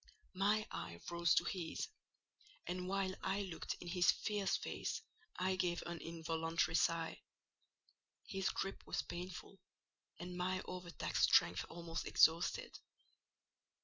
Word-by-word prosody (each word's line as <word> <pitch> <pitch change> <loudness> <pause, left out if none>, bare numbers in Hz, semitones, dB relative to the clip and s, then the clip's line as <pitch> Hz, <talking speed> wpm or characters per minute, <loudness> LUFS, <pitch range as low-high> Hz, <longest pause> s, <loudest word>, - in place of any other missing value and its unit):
My 205 +3 +3
eye 85 0 -5
rose 170 0 +4
to - - +5
his; 175 -4 -2 0.8
and 180 +1 -3
while 190 0 0
I 195 +2 0
looked 180 -4 -4
in 175 - -8
his 175 0 +3
fierce 205 -3 0
face - - -3 0.3
I 185 +1 +1
gave 175 -2 0
an 170 -1 -4
involuntary 165 0 0
sigh; 165 -1 +2 1.0
his 195 -1 0
gripe 195 - -3
was - - 0
painful, 180 +2 -7 0.6
and 180 0 -6
my 185 +1 0
over 180 -1 -6
taxed - - +2
strength 85 +1 +5
almost 165 -1 -4
exhausted. 175 - +4
180 Hz, 125 wpm, -38 LUFS, 165-190 Hz, 1.0 s, to